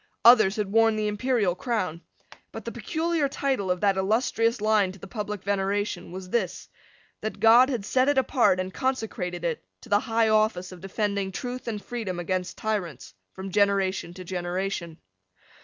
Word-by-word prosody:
Others 215 Hz, -5 st, +7 dB
had 210 Hz, -3 st, -2 dB
worn 225 Hz, 0 st, +4 dB
the 215 Hz, 0 st, -1 dB
imperial 210 Hz, -2 st, +1 dB
crown. 185 Hz, -5 st, -2 dB, 0.5 s
But -, -, -8 dB
the -, -, -4 dB
peculiar 325 Hz, -3 st, -1 dB
title 265 Hz, -9 st, -1 dB
of 180 Hz, -1 st, 0 dB
that 200 Hz, -2 st, +3 dB
illustrious 225 Hz, +3 st, +1 dB
line 210 Hz, -3 st, +2 dB
to -, -, -13 dB
the -, -, -10 dB
public 210 Hz, -2 st, -5 dB
veneration 200 Hz, -2 st, -1 dB
was 185 Hz, 0 st, -8 dB
this, 200 Hz, -7 st, -1 dB, 0.5 s
that 215 Hz, -, -4 dB
God 240 Hz, +4 st, +7 dB
had 235 Hz, -7 st, -2 dB
set 260 Hz, +5 st, +2 dB
it 290 Hz, -, +1 dB
apart 255 Hz, -7 st, +3 dB
and 185 Hz, 0 st, -3 dB
consecrated 205 Hz, -9 st, -2 dB
it 165 Hz, -, -2 dB, 0.2 s
to -, -, -14 dB
the 205 Hz, -, +4 dB
high 225 Hz, -1 st, +1 dB
office 215 Hz, -4 st, +1 dB
of 180 Hz, -2 st, -11 dB
defending 200 Hz, 0 st, -2 dB
truth 250 Hz, +6 st, -5 dB
and 215 Hz, -2 st, -2 dB
freedom 205 Hz, -5 st, -5 dB
against 180 Hz, +1 st, -2 dB
tyrants 190 Hz, -, -3 dB, 0.2 s
from 190 Hz, 0 st, -7 dB
generation 195 Hz, -3 st, +1 dB
to 185 Hz, -, -8 dB
generation. 175 Hz, -1 st, -3 dB
205 Hz, 170 wpm, -26 LUFS, 185-225 Hz, 0.5 s, Others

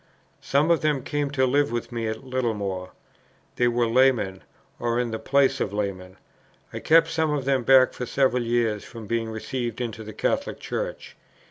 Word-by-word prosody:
Some 145 Hz, +4 st, +2 dB
of 165 Hz, -, +3 dB
them 150 Hz, -4 st, 0 dB
came 145 Hz, -1 st, -2 dB
to 135 Hz, -2 st, +1 dB
live 140 Hz, 0 st, +2 dB
with 120 Hz, 0 st, -3 dB
me 115 Hz, -1 st, -3 dB
at 110 Hz, +3 st, -4 dB
Littlemore. 105 Hz, -8 st, -2 dB, 0.7 s
They 120 Hz, -, +3 dB
were 120 Hz, 0 st, +1 dB
laymen, 115 Hz, -6 st, +2 dB, 0.4 s
or 120 Hz, 0 st, 0 dB
in 120 Hz, -2 st, -1 dB
the 110 Hz, -, -3 dB
place 135 Hz, +3 st, +2 dB
of 100 Hz, -, -2 dB
laymen. 95 Hz, -3 st, -4 dB, 0.6 s
I -, -, -4 dB
kept 165 Hz, +1 st, +4 dB
some 160 Hz, -1 st, +1 dB
of 145 Hz, -3 st, -1 dB
them 135 Hz, -2 st, +2 dB
back 130 Hz, +1 st, +6 dB
for 125 Hz, -, -5 dB
several 130 Hz, -2 st, +2 dB
years 115 Hz, -3 st, 0 dB
from 115 Hz, -2 st, -10 dB
being 115 Hz, +1 st, -2 dB
received 120 Hz, +1 st, -4 dB
into 115 Hz, -2 st, -4 dB
the 110 Hz, -, -8 dB
Catholic 275 Hz, -, -2 dB
Church. -, -, -5 dB
120 Hz, 185 wpm, -25 LUFS, 110-135 Hz, 0.7 s, back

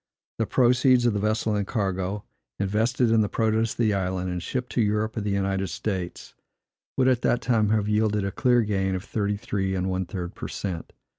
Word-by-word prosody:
The 115 Hz, -, +1 dB
proceeds 125 Hz, 0 st, +4 dB
of 120 Hz, -, +3 dB
vessel 105 Hz, +1 st, 0 dB
and 100 Hz, -1 st, -1 dB
cargo, 95 Hz, -2 st, -2 dB, 0.3 s
invested 110 Hz, +5 st, +1 dB
in 115 Hz, -1 st, +5 dB
the 105 Hz, -, 0 dB
produce 110 Hz, 0 st, +1 dB
of -, -, -21 dB
the 110 Hz, -3 st, +2 dB
island, 95 Hz, -1 st, -1 dB
and 90 Hz, -1 st, -3 dB
shipped 125 Hz, +6 st, -3 dB
to 120 Hz, -, +1 dB
Europe 105 Hz, +1 st, 0 dB
or 110 Hz, -, -2 dB
the 105 Hz, -, -2 dB
United 95 Hz, -1 st, 0 dB
States, 90 Hz, 0 st, -4 dB, 0.6 s
would, 130 Hz, -1 st, +3 dB
at 125 Hz, -2 st, +3 dB
that 120 Hz, -, +2 dB
time, 115 Hz, -4 st, +2 dB
have 105 Hz, -1 st, +1 dB
yielded 105 Hz, -1 st, +1 dB
a 100 Hz, -, -2 dB
clear 120 Hz, +3 st, +3 dB
gain 95 Hz, -2 st, 0 dB
of 90 Hz, -, -4 dB
thirty 105 Hz, -1 st, -1 dB
three 95 Hz, -2 st, -2 dB
and 95 Hz, 0 st, -1 dB
one 95 Hz, -1 st, -2 dB
third 90 Hz, -2 st, -5 dB
per -, -, -6 dB
cent. 90 Hz, -5 st, -5 dB
105 Hz, 205 wpm, -25 LUFS, 95-115 Hz, 0.6 s, in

